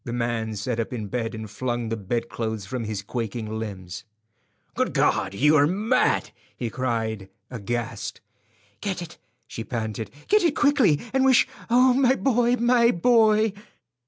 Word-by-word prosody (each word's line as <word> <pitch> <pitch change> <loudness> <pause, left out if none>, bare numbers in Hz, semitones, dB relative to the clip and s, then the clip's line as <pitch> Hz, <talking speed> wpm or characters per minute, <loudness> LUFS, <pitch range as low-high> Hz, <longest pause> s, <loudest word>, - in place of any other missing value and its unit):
The 120 - -5
man 120 -2 -2
sat 110 +3 -3
up 115 - -2
in 110 -4 -5
bed 115 -1 -3
and 110 0 -6
flung 120 +1 -3
the 115 - -1
bedclothes 110 0 -3
from 115 +3 -4
his 105 -2 -4
quaking 110 0 -4
limbs. 95 -4 -7 0.7
"Good - - -1
God, 95 0 +1
you 150 +8 +4
are 145 -1 +5
mad!" 215 +9 +1 0.3
he 120 -3 -3
cried, 110 -5 -2 0.2
aghast. 120 0 -4 0.6
"Get 190 -3 -3
it," 170 0 -12 0.3
she 115 - -7
panted; 110 -3 -4 0.2
"get 425 0 +4
it 330 -4 +2
quickly, 265 - +3
and 265 0 +3
wish—Oh, 255 -1 +3
my 260 0 +3
boy, 245 -2 +2
my 240 -1 +4
boy!" 220 +1 +3
120 Hz, 150 wpm, -24 LUFS, -, 0.7 s, are